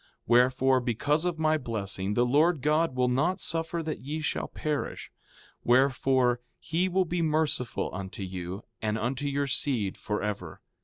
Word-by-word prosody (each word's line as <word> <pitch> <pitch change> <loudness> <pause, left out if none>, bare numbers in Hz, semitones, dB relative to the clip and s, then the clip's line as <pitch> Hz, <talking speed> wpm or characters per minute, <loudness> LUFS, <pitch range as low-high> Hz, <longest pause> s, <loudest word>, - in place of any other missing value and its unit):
4:7 - - -31 0.2
Wherefore, 130 +2 +4
because 145 +7 0
of 175 -2 -1
my 155 0 +2
blessing 105 -5 -2
the 120 - +3
Lord 150 +4 +3
God 150 -1 +2
will 125 -1 +2
not 135 +9 +1
suffer 165 0 -1
that 155 0 -4
ye 150 +4 -4
shall 155 - -2
perish; 150 -2 -4 0.5
wherefore, 130 -1 +3 0.2
he 175 +3 -1
will 185 +1 +2
be 175 0 -1
merciful 155 -6 0
unto 95 +1 -6
you 90 +1 -6 0.2
and 110 0 0
unto 130 +5 -2
your 140 0 0
seed 125 -7 0
forever. 105 -6 -3
130 Hz, 155 wpm, -28 LUFS, 115-155 Hz, 0.5 s, Wherefore